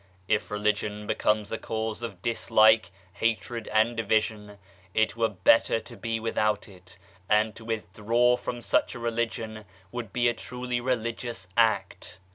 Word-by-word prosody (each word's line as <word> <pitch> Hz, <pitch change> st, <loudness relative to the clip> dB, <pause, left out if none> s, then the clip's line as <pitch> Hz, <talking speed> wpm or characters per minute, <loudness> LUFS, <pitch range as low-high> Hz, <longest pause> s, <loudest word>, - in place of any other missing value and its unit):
If 110 Hz, -1 st, +1 dB
Religion 105 Hz, 0 st, -1 dB
becomes 105 Hz, 0 st, 0 dB
a 115 Hz, -, -2 dB
cause 110 Hz, 0 st, -3 dB
of 100 Hz, -6 st, -7 dB
dislike, 110 Hz, -1 st, +4 dB, 0.2 s
hatred 115 Hz, +2 st, -1 dB
and 110 Hz, +2 st, +2 dB
division, 110 Hz, -2 st, 0 dB, 0.4 s
it 110 Hz, 0 st, +2 dB
were 115 Hz, -1 st, +1 dB
better 110 Hz, +3 st, +4 dB
to -, -, -12 dB
be 115 Hz, -1 st, -3 dB
without 110 Hz, -2 st, 0 dB
it, 90 Hz, -2 st, -16 dB, 0.3 s
and 105 Hz, 0 st, +3 dB
to 115 Hz, -, -11 dB
withdraw 115 Hz, +2 st, +1 dB
from 120 Hz, -1 st, -5 dB
such -, -, +1 dB
a -, -, -6 dB
Religion 115 Hz, -2 st, -2 dB, 0.3 s
would 120 Hz, -4 st, -5 dB
be 120 Hz, +2 st, +2 dB
a 120 Hz, -, +3 dB
truly 125 Hz, 0 st, -4 dB
religious 115 Hz, -5 st, -3 dB
act. 100 Hz, -5 st, +1 dB
110 Hz, 145 wpm, -27 LUFS, 105-115 Hz, 0.4 s, dislike